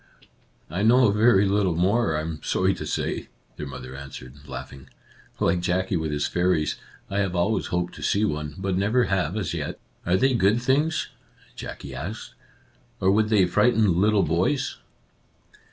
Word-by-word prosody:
" - - -37 0.3
I 90 +4 -2
know 120 +1 +5
very 105 -2 +4
little 95 -3 +1
more, 95 0 +2
I - - -1
am 80 -1 -5
sorry - - +1
to - - -6
say," - - -2 0.3
their 75 - -5
mother 65 -1 -8
answered, 70 -2 -9
laughing. 65 -1 -9 0.2
" - - -28
Like 85 +1 +2
Jackie 95 +1 0
with 80 -2 -1
his 75 0 -1
fairies, 90 -3 +1 0.3
I 100 - -2
have 95 -2 0
always 95 +4 +1
hoped 90 0 -2
to - - -10
see 105 +2 +2
one, 75 -5 -3
but 95 -1 -1
never 105 +6 +2
have 95 -4 0
as 100 -5 -2
yet." - - -4 0.2
"Are 90 +2 +2
they 135 +3 +3
good 110 0 +3
things? 145 +6 +1 0.2
" - - -29
Jackie 70 - -8
asked, 80 +12 -6 0.3
" - - -35
or 95 0 +3
would 105 +1 +2
they 105 -4 +4
frighten 95 -1 +3
little 105 -1 +4
boys 85 - 0
95 Hz, 180 wpm, -25 LUFS, 80-105 Hz, 0.3 s, know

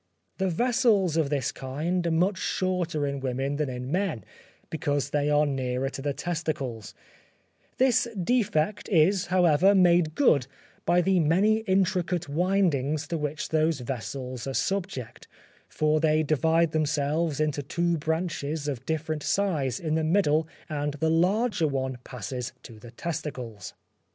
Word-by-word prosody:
The 190 0 +1
vessels 220 - +2
of 160 -4 +1
this 140 -2 -1
kind 165 +7 -2
are - - +2
much 180 +4 +1
shorter 175 -5 -1
in 140 0 -2
women 135 +2 -2
than 150 -2 -1
in 125 +1 -5
men, 175 - -1 0.5
because 145 -3 -1
they 145 0 +1
are 150 0 +4
nearer 130 -1 -1
to 135 - -7
the 145 +1 -1
testicles; 145 -9 -4 0.8
this 255 -2 +3
defect 200 -3 0
is, 180 0 +3
however, 180 +1 +4
made 175 -4 +4
good 140 - +3 0.4
by 175 +1 +4
the 185 +1 +2
many 185 +8 +3
intricate 185 -2 +1
windings 155 -3 +1
to 170 - -1
which 150 0 -3
those 155 -2 +1
vessels 125 +1 -5
are 135 - -3
subject; 190 - -3 0.4
for 155 0 +1
they 155 0 +2
divide 160 +2 +2
themselves 155 0 0
into 150 -2 0
two 170 +4 -1
branches 160 -2 -2
of 135 -5 -4
different 160 -1 -2
size 150 - 0
in 155 -2 -2
the 160 0 +1
middle 160 -2 +2 0.2
and 150 -2 -2
the 160 +2 0
larger 185 +2 +2
one 130 -3 -2
passes 125 +1 -5
to 115 -3 -12
the 120 - -12
testicles. 125 - -6
155 Hz, 145 wpm, -27 LUFS, 140-175 Hz, 0.8 s, are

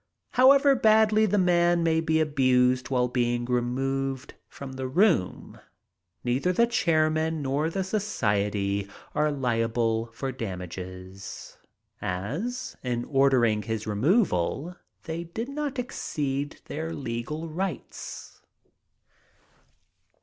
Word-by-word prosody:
However 275 +2 +6
badly 220 -2 +4
the 205 +1 +1
man 175 -2 +3
may 160 -1 +2
be 160 -1 +1
abused 130 -4 +2
while 125 -2 +2
being 120 -1 0
removed 135 +2 -1
from 140 -1 -9
the 130 0 -4
room, 170 - +1 0.6
neither 130 +9 +1
the 235 +6 +4
chairman 160 -7 +1
nor 140 +4 0
the 190 +3 -2
society 105 - -1 0.2
are 150 0 +2
liable 115 -3 0
for 135 +3 -4
damages, 95 -3 -7 0.4
as, 180 - -3
in 120 -2 -2
ordering 130 -6 +3
his 110 0 -3
removal, 140 - +1 0.3
they 165 +1 -4
did 225 +9 -5
not 285 -1 -3
exceed 145 - -3
their 160 +2 -4
legal 140 +6 -4
rights. 175 +1 -6
140 Hz, 105 wpm, -27 LUFS, 120-175 Hz, 0.6 s, However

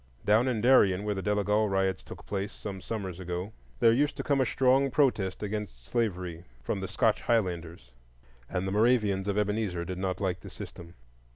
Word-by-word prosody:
Down 110 +5 +4
in 120 -4 0
Darien, 100 -6 +5
where 105 0 -1
the 95 - -3
Delegal 105 +1 +1
riots 95 -1 0
took - - -11
place 100 0 -3
some 95 -2 -7
summers 95 -5 -5
ago, 90 +3 -4 0.3
there 115 - +6
used 145 +5 +1
to - - -3
come 140 -2 +2
a 130 - +2
strong 135 +2 +3
protest 120 -9 +1
against 105 - -5
slavery 90 - -2 0.2
from 100 - -2
the 95 - -4
Scotch - - +1
Highlanders; 85 - -1 0.6
and 90 +1 -2
the - - -2
Moravians 105 -3 +2
of 100 0 0
Ebenezer 105 -4 -1
did 90 0 -5
not 95 -1 -2
like 95 -3 -1
the - - -10
system. 85 0 -10
100 Hz, 185 wpm, -29 LUFS, 90-110 Hz, 0.6 s, there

